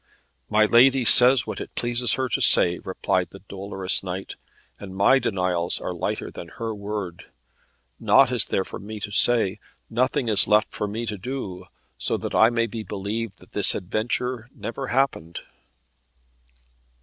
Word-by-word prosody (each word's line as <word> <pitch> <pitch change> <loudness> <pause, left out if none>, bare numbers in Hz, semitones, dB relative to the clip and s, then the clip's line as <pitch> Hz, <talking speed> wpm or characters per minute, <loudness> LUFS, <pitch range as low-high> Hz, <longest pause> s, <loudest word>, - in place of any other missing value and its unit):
"My 110 0 +3
lady 125 +3 +4
says 125 +3 +7
what - - -6
it - - -10
pleases 120 -1 0
her 130 0 -1
to - - -2
say," 85 0 +4
replied 95 -1 -2
the 95 - -15
dolorous 95 -1 -2
knight, 95 +1 -6 0.4
"and 95 -2 -10
my 100 +8 +4
denials 90 -6 -1
are 90 - -5
lighter 85 - -4
than 85 - -10
her 115 -1 -4
word. 100 -4 -7 0.7
Naught 135 -2 +4
is 125 -3 +1
there 95 - -1
for - - -8
me 105 +2 -8
to 105 - -7
say; 110 -2 +4 0.3
nothing 125 +1 0
is 100 -4 +4
left 105 0 +2
for 105 - -4
me 110 +3 -5
to 105 -3 -5
do, 100 -6 -6 0.3
so - - -1
that - - -6
I 110 - +5
may 115 -1 0
be 115 0 -7
believed 105 +1 -5
that - - -19
this - - +5
adventure 120 +5 -3
never 130 +3 -6
happened." 120 - -2
110 Hz, 160 wpm, -23 LUFS, 95-120 Hz, 0.7 s, says